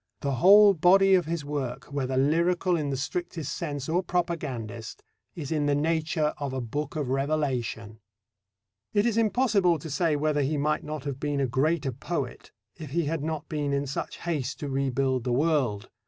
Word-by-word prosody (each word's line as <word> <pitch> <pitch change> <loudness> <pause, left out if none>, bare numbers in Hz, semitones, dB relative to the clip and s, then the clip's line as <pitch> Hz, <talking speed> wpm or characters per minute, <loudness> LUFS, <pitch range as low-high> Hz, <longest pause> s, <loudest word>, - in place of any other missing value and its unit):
The 140 - -1
whole 200 - +8
body 195 +3 +5
of 180 -4 +3
his 165 -3 -3
work, 140 -2 -4
whether 130 -2 -1
lyrical 170 +6 +2
in 150 -3 -1
the 135 - -2
strictest 165 +1 -4
sense 145 -5 -4
or 170 +3 +1
propagandist, 140 - -3 0.3
is 150 -4 -6
in 150 -2 +1
the 145 - +3
nature 155 0 0
of 140 -2 -3
a 130 - -2
Book 145 +6 -4
of 145 -5 -2
Revelation. 130 -6 -2 1.0
It 205 +1 +3
is 235 -3 +1
impossible 215 -6 +3
to 155 +1 -8
say 155 +1 +1
whether 150 0 +1
he 145 +2 0
might 150 +2 0
not 150 -2 -5
have 140 -2 -4
been 145 -1 -1
a 135 - +2
greater 140 +3 0
poet 135 0 -5 0.3
if 155 -4 -8
he 165 +3 0
had 155 0 -2
not 160 0 -3
been 145 -2 -2
in 140 0 0
such 135 - -4
haste 145 -7 -3
to 145 - -3
rebuild 135 -1 0
the 125 - -1
world. 130 -8 +1
150 Hz, 185 wpm, -27 LUFS, 135-165 Hz, 1.0 s, whole